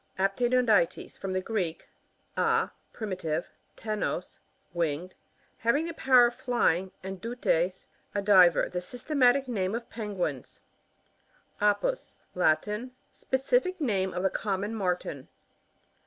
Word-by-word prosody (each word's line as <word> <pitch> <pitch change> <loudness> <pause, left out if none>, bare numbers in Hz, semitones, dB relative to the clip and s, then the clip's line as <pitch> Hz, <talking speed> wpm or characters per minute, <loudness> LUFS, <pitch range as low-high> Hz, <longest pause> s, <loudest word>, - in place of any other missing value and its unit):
APTENoDYTES.: 215 -1 +2
From 195 - -5
thc 185 - -1
Greek, 185 -8 -2 0.5
a, - - +2 0.2
privative 180 -7 -3
— - - -41
ptenos, 215 -1 -3 0.3
winged; 170 +1 -2 0.5
having 255 +8 +2
the 335 - -4
power 255 -5 +6
of 240 - 0
flying, 190 -8 +1
and 190 -1 -6
dutest 400 - 0 0.3
a - - +2
diver. 185 -4 +6
The 180 - -4
systematic 255 - +2
name 200 -4 -1
of 235 0 -6
Penguins* 190 - -4 1.0
Apus. 210 - +1
— - - -40
Latin. 210 +11 +1 0.2
Specific 365 - 0
name 195 - 0
of 180 +1 -3
the 190 - +2
common 205 +1 -2
Martin. 180 -9 -2
210 Hz, 120 wpm, -28 LUFS, 185-245 Hz, 1.0 s, power